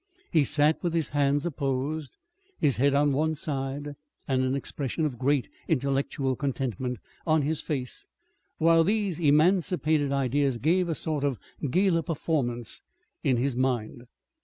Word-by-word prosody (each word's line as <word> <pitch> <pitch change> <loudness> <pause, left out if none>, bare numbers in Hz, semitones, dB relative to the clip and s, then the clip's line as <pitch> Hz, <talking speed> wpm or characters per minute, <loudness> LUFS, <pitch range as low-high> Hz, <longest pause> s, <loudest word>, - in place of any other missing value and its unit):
He 160 -4 +4
sat 150 +2 +2
with 170 -1 -1
his 160 -4 0
hands 145 +1 +1
apposed, 140 -1 -2 0.4
his 140 -8 +2
head 140 +3 +3
on 145 0 +3
one 155 +3 +1
side, 145 0 -4 0.3
and 130 -1 +1
an 130 +1 0
expression 140 +2 -2
of 130 -6 -3
great 135 0 +1 0.2
intellectual 135 -1 0
contentment 130 -3 -2 0.3
on 155 -2 +3
his 155 +2 -1
face 130 -5 -4 0.5
while 165 0 +5
these 200 -2 0
emancipated 155 -1 +3
ideas 140 -1 +1
gave 170 +7 +2
a 165 - 0
sort 150 -2 -2
of 140 -4 0 0.3
gala 180 +3 +3
performance 135 -8 -2 0.4
in 135 -6 +2
his 130 +1 0
mind. 125 -2 -1
145 Hz, 140 wpm, -27 LUFS, 130-160 Hz, 0.5 s, while